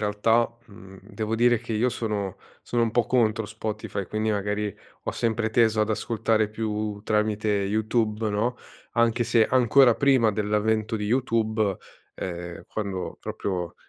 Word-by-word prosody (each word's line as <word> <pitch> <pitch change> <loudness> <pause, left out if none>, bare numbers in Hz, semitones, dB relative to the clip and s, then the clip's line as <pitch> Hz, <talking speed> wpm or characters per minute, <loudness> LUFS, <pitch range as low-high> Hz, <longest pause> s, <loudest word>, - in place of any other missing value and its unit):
realtà, 110 +3 +2 0.2
mhmm, 95 -2 -14
devo 110 +2 -4
dire 120 +1 +4
che 115 0 -6
io 115 +4 +2
sono 105 -5 -3 0.2
sono 120 -1 -1
un 115 - +1
po' 120 +1 +1
contro 110 -3 +1
Spotify, 105 -2 -4
quindi 110 0 -1
magari 105 0 -1 0.3
ho - - -1
sempre 115 -1 0
teso 110 -1 +3
ad 105 - +1
ascoltare 110 0 0
più 105 -1 -3
tramite 105 0 0
Youtube, 105 +2 0
no. 115 +5 0 0.4
Anche 115 0 +2
se, 115 -1 +3
ancora 125 -1 +5
prima 130 -5 +4
dell'avvento 105 +1 0
di 105 -1 -3
Youtube, 110 -4 +1 0.4
ehm, 85 -1 -6
quando 100 -4 -4
proprio 90 -4 -4
110 Hz, 145 wpm, -25 LUFS, 105-115 Hz, 0.4 s, ancora